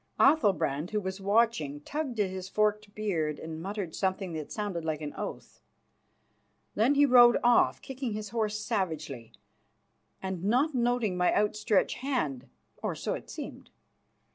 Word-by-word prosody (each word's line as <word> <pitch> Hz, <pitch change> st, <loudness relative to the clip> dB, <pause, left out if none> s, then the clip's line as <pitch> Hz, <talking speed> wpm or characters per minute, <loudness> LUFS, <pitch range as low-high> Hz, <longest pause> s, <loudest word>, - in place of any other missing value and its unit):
Athalbrand, 190 Hz, -, +3 dB
who 210 Hz, -, 0 dB
was 190 Hz, 0 st, -5 dB
watching, 200 Hz, -9 st, +1 dB
tugged 275 Hz, -, -4 dB
at 195 Hz, -3 st, +1 dB
his 190 Hz, 0 st, -6 dB
forked 210 Hz, 0 st, 0 dB
beard 165 Hz, -8 st, -1 dB
and 160 Hz, 0 st, -7 dB
muttered 195 Hz, -2 st, -4 dB
something 190 Hz, -2 st, -1 dB
that 155 Hz, -2 st, -6 dB
sounded 205 Hz, -6 st, -3 dB
like 155 Hz, -2 st, -2 dB
an 150 Hz, -1 st, -5 dB
oath. -, -, -7 dB, 1.1 s
Then 240 Hz, +7 st, +3 dB
he 290 Hz, +1 st, +6 dB
rode 245 Hz, -2 st, +7 dB
off, 240 Hz, 0 st, +4 dB
kicking 260 Hz, -4 st, -4 dB
his 210 Hz, -1 st, -5 dB
horse 215 Hz, -2 st, -1 dB
savagely 160 Hz, -, -3 dB, 0.9 s
and 190 Hz, -2 st, -4 dB
not 255 Hz, +10 st, +2 dB
noting 240 Hz, -5 st, +1 dB
my 180 Hz, 0 st, +3 dB
outstretched 210 Hz, 0 st, +1 dB
hand, 195 Hz, -, -2 dB, 0.3 s
or -, -, -2 dB
so -, -, -2 dB
it -, -, -7 dB
seemed. -, -, -8 dB
205 Hz, 145 wpm, -29 LUFS, 170-235 Hz, 1.1 s, rode